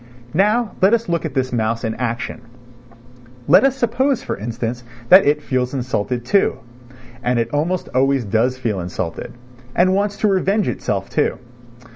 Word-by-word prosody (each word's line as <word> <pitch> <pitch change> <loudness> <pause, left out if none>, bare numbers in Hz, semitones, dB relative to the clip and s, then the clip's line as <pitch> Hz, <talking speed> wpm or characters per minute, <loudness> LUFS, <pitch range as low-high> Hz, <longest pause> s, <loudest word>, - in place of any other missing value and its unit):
Now 210 +5 +2
let 195 +5 +6
us 230 -1 -4
look 170 -1 -1
at 150 -3 -5
this 130 -1 -1
mouse 115 0 -1
in 110 -1 -1
action. 120 -1 -4 1.1
Let 170 - +6
us 270 -1 +3
suppose, 260 +2 0
for - - -3
instance, 115 +3 -4 0.3
that 185 -3 +8
it 150 +1 +2
feels 130 0 -1
insulted, 125 -1 -2
too 195 +10 +2 0.6
(and 125 -1 0
it 115 0 -1
almost 165 +5 -1
always 135 -1 +2
does 115 +5 +1
feel 115 -6 -2
insulted), 85 -1 -5 0.4
and 185 +2 +4
wants 200 +1 0
to 215 - +1
revenge 195 +1 +1
itself, - - -3
too. - - 0
135 Hz, 160 wpm, -19 LUFS, 120-195 Hz, 1.1 s, that